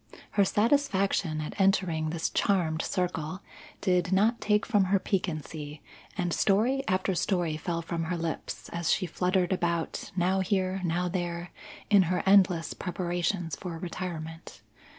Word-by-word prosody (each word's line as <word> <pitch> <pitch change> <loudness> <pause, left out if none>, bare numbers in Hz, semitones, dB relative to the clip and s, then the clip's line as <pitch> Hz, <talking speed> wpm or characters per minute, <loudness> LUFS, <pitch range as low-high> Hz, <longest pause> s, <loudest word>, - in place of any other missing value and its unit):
Her 200 - +4
satisfaction 195 - +1
at 150 - -5
entering 180 -5 +2
this 160 0 -2
charmed 165 -5 +1
circle 180 0 -2 0.4
did 180 -1 +1
not 215 +5 +3
take 210 0 +2
from 205 -5 +3
her 195 +2 +3
piquancy, 155 -6 -3 0.3
and 175 -3 0
story 230 +7 +2
after 185 +1 +1
story 175 -3 0
fell 170 +2 -3
from 165 0 -3
her 175 +2 -2
lips, 165 -1 -4
as 170 -1 -1
she 185 - +2
fluttered 180 +2 +1
about, 170 -3 -2
now 185 +1 +2
here 190 0 0
now 175 +1 0
there, 175 -1 -3 0.4
in 200 -2 +7
her 180 -1 0
endless 185 -4 +4
preparations 175 -1 -2
for 175 -3 -6
retirement. 165 -2 -6
180 Hz, 140 wpm, -28 LUFS, 165-195 Hz, 0.4 s, in